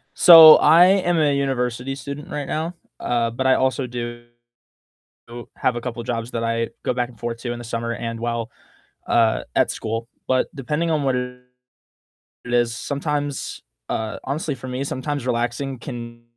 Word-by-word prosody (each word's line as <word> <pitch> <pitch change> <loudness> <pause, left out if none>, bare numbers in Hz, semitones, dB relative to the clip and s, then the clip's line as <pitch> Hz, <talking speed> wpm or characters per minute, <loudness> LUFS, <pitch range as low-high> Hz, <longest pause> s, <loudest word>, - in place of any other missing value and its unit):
So, 165 -3 +10
I 170 +2 +6 0.2
am 175 -1 +1
a 150 -3 +3
university 130 -1 -2
student 140 +5 -8
right 145 -5 -4
now, 165 +3 -3 0.2
uh, 115 -1 0
but 130 +3 -1
I 130 - +5
also 130 0 0
do 120 -1 -6 1.0
do 120 0 -9
have 125 - 0
a - - -4
couple 120 -1 -5
jobs 115 0 -4
that 115 - -3
I 115 0 -1
go - - 0
back 125 0 -1
and 120 - -16
forth 115 0 -4
to 120 0 -4
in 120 - -8
the 120 - -8
summer 115 0 -3
and 115 -1 -5
while, 115 -1 -3 0.6
uh, 115 -2 +2
at - - +2
school. 115 +2 -4 0.2
But 130 -1 +1
depending 150 +5 -2
on 155 -2 +1
what 135 -2 +1
it 125 0 -5 1.1
it 120 - -2
is, 120 -1 +2
sometimes, 145 +1 -3 0.3
uh, 110 -1 -3
honestly 145 +2 -3
for 130 0 -10
me, 130 +1 -4
sometimes 140 -1 -4
relaxing 125 +2 -2
can 120 -1 -8
125 Hz, 175 wpm, -22 LUFS, 120-140 Hz, 1.1 s, So